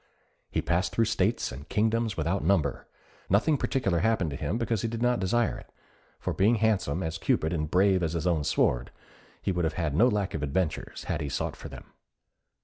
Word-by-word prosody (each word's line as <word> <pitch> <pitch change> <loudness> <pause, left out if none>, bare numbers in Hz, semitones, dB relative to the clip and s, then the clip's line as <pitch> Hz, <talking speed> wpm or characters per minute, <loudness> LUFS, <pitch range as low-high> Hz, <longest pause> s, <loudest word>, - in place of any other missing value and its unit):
He - - -1
passed 90 +2 0
through 115 - +3
states 110 0 0
and 70 +5 -10
kingdoms 110 -1 +1
without 85 +4 0
number: 80 -5 +1 0.4
nothing 110 - +3
particular 100 -10 0
happened 110 -7 +1
to - - -4
him 75 +8 -2
because 115 -3 -1
he - - -1
did 115 0 -4
not 125 0 +2
desire 115 +5 +1
it; - - -16 0.5
for - - -2
being 105 +5 +3
handsome 95 -7 +1
as 80 0 -3
Cupid 80 +2 +1
and 75 -3 -2
brave 95 +1 +3
as 80 -2 -1
his 85 -1 -2
own 85 -4 +1
sword, 60 -3 +1 0.5
he - - 0
would 90 -1 -1
have 80 -1 -1
had 80 -5 -1
no 110 +12 +5
lack 105 -5 0
of 80 - -3
adventures 75 +3 -2
had - - -2
he 75 - -3
sought - - -2
for - - -9
them. - - -12
95 Hz, 205 wpm, -28 LUFS, 80-110 Hz, 0.5 s, no